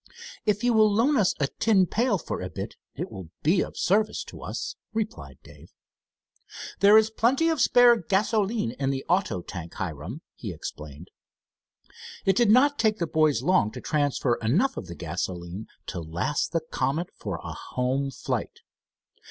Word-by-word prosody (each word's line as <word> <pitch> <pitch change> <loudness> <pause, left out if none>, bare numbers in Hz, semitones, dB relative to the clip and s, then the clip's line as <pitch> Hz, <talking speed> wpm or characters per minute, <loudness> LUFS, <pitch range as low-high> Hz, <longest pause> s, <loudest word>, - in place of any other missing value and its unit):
"If 210 +2 +1
you 245 -1 +3
will 215 -1 +5
loan 235 +8 +3
us 205 -8 +3
a 145 - +2
tin 205 -4 +4
pail 225 +3 +1
for - - -5
a - - -4
bit - - -6 0.2
it - - -5
will 95 -4 -8
be 175 +5 +3
of - - -5
service 210 +3 +1
to - - -11
us," - - -5 0.2
replied 220 -1 -4
Dave. - - -16 1.1
"There 205 +2 +7
is 220 0 +4
plenty 265 +9 +2
of 320 -5 0
spare 245 -1 +6
gasoline 210 - 0
in 135 -1 0
the 135 -1 -2
auto 170 - 0
tank, 85 -3 -8
Hiram," 90 - -5
he 105 - -6
explained. 75 0 -8 1.2
It 195 - +3
did 235 0 +3
not 285 +6 +5
take 220 -1 +2
the 170 - -1
boys 155 -6 +2
long 175 - +3
to - - -6
transfer 145 -5 0
enough 170 - +2
of - - -6
the 85 - -8
gasoline 85 +4 -5 0.2
to 90 - -5
last 85 - -2
the 165 - 0
Comet 155 +2 -2
for - - -5
a - - -5
home 130 +2 -2
flight. - - -4
165 Hz, 170 wpm, -26 LUFS, -, 1.2 s, There